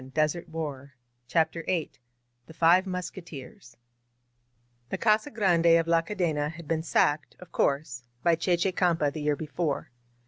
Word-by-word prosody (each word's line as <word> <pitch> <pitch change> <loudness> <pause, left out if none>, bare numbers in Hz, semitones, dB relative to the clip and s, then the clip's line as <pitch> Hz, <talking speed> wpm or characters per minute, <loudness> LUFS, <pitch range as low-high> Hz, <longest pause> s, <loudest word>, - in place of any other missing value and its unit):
• 130 +1 -12
• 155 +3 +1
• 150 -4 -5 0.4
CHAFTER 165 +3 +1
VIII 170 -5 0 0.6
THE 160 - -12
FIVE 175 +4 +4
MUSKETEERS 170 -9 -7 1.1
THE - - -2
Casa 215 +4 +2
Grande 170 - +4
of 165 - -2
La 165 0 +4
Cadena 165 -5 -1
had 165 -1 -11
been 160 0 0
sacked, 150 -2 +1
of 180 - -14
course, 140 -3 0 0.2
by 170 - +4
Che 175 +2 +1
Che 185 +2 +1
Campa 170 -6 +1
the 155 - -5
year 150 0 +1
be 155 - -6
fore. 150 -4 -2
165 Hz, 160 wpm, -28 LUFS, 150-175 Hz, 1.1 s, FIVE